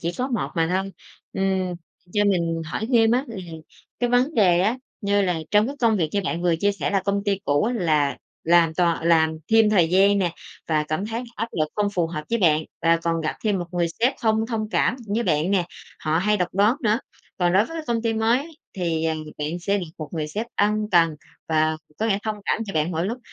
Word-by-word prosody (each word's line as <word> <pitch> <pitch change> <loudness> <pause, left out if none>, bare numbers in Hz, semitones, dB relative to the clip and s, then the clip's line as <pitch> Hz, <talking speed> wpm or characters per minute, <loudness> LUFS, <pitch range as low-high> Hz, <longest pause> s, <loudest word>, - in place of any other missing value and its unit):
chỉ 170 +1 -2
có 255 +6 -3
một 235 -5 -1
mà 165 -1 +2
thôi. 190 +1 -1 0.4
Ừm, 190 -2 0 0.4
cho 205 0 +2
mình 170 -4 +1
hỏi 215 +7 -3
thêm 225 -2 +5
á, 255 +3 +2
là 230 - -7 0.6
cái 245 -1 +1
vấn 255 +6 +2
đề 180 -5 +4
á, 220 +7 +1 0.2
như 200 -1 +2
là 180 -3 0
trong 210 +1 +4
cái 280 +3 -5
công 225 -3 +3
việc 165 -4 0
như 205 - +1
bạn 170 0 -2
vừa 175 -2 +2
chia 200 +5 +1
sẻ 150 -8 -3
là 195 -1 +1
công 200 0 0
ty 200 -2 +1
cũ 145 0 +2
á 240 - 0
là 155 - +1 0.3
làm 165 -1 +4
toàn 170 -2 +1
làm 160 -1 +3
thêm 225 -1 +6
thời 180 -6 +4
gian 200 +2 +4
nè, 180 -3 +1 0.4
và 155 -2 +2
cảm 155 +6 -2
thấy 230 +3 -3
áp 230 - -2
lực 155 -1 0
không 205 -1 +1
phù 175 -2 +1
hợp 155 -2 -5
với 235 - +1
bạn 160 -5 +3 0.2
và 165 0 +4
còn 165 0 -1
gặp 155 - -2
thêm 205 -3 +1
một 175 - -3
người 175 -1 +1
sếp 250 +4 +4
không 220 0 +2
thông 220 -2 -3
cảm 250 - +1 0.2
với 235 - +1
bạn 160 -2 +1
nè, 190 -3 +2 0.4
họ 155 +1 +1
hay 210 +4 +2
độc 180 -2 0
đoán 205 +6 +3
nữa. 220 0 +2 0.4
Còn 175 -1 +2
đối 195 +3 +4
với 330 - -8
công 230 -1 -1
ty 230 -1 +1
mới 245 +8 0 0.2
thì, 165 -4 -1
à, 160 -1 +1 0.2
bạn 150 +4 -3
sẽ 200 +3 0
được 180 - -4
một 155 - -6
người 155 -2 -2
sếp 215 +9 -4
ân 210 +1 +1
cần 165 -3 +4 0.3
và 155 0 +2 0.2
có 220 - 0
lẽ 200 -3 +1
thông 215 -1 -2
cảm 225 - 0
cho 195 - -6
bạn 155 +2 +1
mỗi 165 +1 -1
lúc. 235 +5 -3
190 Hz, 240 wpm, -23 LUFS, 165-220 Hz, 0.6 s, thêm